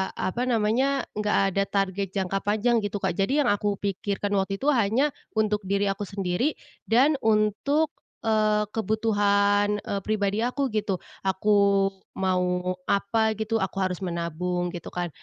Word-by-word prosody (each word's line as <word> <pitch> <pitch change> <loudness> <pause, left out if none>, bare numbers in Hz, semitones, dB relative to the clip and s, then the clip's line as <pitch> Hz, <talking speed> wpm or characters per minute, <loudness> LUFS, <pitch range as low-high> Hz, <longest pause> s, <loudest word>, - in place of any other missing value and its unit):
apa 235 +6 -2
namanya, 245 +4 +1
enggak 210 0 +1 0.2
ada 195 - +2
target 195 -1 -1
jangka 195 0 0
panjang 220 +3 +2
gitu, 205 -1 -3
Kak, 170 - -1
jadi 270 +9 +2
yang - - +2
aku 205 0 +1
pikirkan 200 0 -2
waktu 195 +1 -1
itu 285 - +2
hanya 235 +4 +2 0.2
untuk 215 -1 +1
diri 200 +1 +1
aku 200 +1 -3
sendiri 195 - -1 0.3
dan 270 +6 +4
untuk, 220 +9 +2 0.3
eee, 215 -1 +2
kebutuhan, 205 -2 +2
eee, 200 - -3
pribadi 215 +1 0
aku 265 +2 -1
gitu. 210 -4 -2 0.2
Aku 200 0 +3 0.2
mau 180 -1 0
apa 220 +2 +1
gitu, 220 +1 -1
aku 195 -1 -2
harus 185 -2 0
menabung 175 +1 -2
gitu 175 -1 -8
kan. 175 -1 -2
205 Hz, 145 wpm, -26 LUFS, 195-220 Hz, 0.3 s, dan